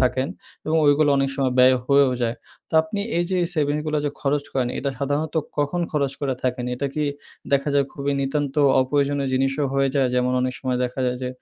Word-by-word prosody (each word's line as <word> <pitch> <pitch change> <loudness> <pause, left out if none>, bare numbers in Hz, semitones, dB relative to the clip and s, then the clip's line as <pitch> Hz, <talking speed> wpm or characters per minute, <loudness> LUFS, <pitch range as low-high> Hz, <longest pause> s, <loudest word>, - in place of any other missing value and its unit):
থাকেন, 130 +2 +1 0.4
এবং 160 +1 +1
ওইগুলো 145 +1 +4
অনেক 135 0 +1
সময় 130 -2 0
ব্যয় 130 0 +6
হয়েও 140 -2 +4
যায়। 115 0 -1 0.3
তো - - -7
আপনি 180 +6 -4 0.2
এই 175 - +1
যে 185 - +1
এই - - +1
সেভিংসগুলা 150 0 0
যে 145 - 0
খরচ 145 0 0
করেন 130 -2 0
এটা 140 +1 -1
সাধারণত 145 +3 -2 0.2
কখন 145 +5 0
খরচ 140 -3 0
করে 135 -2 -1
থাকেন? 125 -1 -1
এটা 140 +3 -2
কি 150 -1 0 0.5
দেখা 140 +1 +2
যায় 140 -1 +4
খুবই 140 0 -2
নিতান্ত 140 +1 -1 0.3
অপ্রয়োজনীয় 140 +1 0
জিনিসও 135 +2 +1
হয়ে 135 0 +2
যায়? 135 -3 +2
যেমন 125 0 +1
অনেক 130 0 -1
সময় 125 -2 -1
দেখা 125 +2 -4
যায় 125 - -1
যে 125 - -2
140 Hz, 205 wpm, -23 LUFS, 130-145 Hz, 0.5 s, ব্যয়